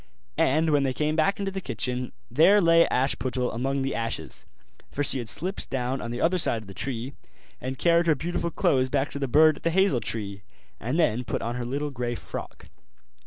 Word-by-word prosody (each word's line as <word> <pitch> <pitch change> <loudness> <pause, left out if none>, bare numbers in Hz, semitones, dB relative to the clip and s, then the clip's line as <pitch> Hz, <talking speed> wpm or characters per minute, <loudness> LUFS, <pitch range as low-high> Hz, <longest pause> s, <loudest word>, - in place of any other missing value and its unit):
And 155 +4 +3
when 145 -1 +3
they 135 -1 0
came 155 0 0
back 195 +6 +2
into 200 -1 -2
the 195 0 -4
kitchen, 125 - -3 0.2
there 170 - +6
lay 165 -2 +5
Ashputtel 130 -1 0
among 135 +4 -1
the 135 - -1
ashes; 115 0 -4 0.4
for 145 - -2
she 135 - +2
had 115 -3 -5
slipped 185 - -3
down 130 0 -2
on 115 - -5
the 120 +1 -4
other 180 +2 +2
side 115 -8 0
of - - -16
the 95 - -9
tree, 125 +5 -4 0.5
and 130 +1 -4
carried 170 +2 +3
her 155 - +4
beautiful 170 +3 -2
clothes 130 -5 +1
back 140 +1 0
to 140 - -5
the 135 - -1
bird 155 +5 +5
at - - -13
the 165 - +1
hazel 190 -5 +3
tree, 105 -2 -3 0.4
and 125 +10 -2
then 125 -7 +2
put - - -3
on 115 - -2
her 125 0 -4
little 145 +4 -3
grey 120 -2 -3
frock. - - -8
135 Hz, 215 wpm, -26 LUFS, 125-160 Hz, 0.5 s, there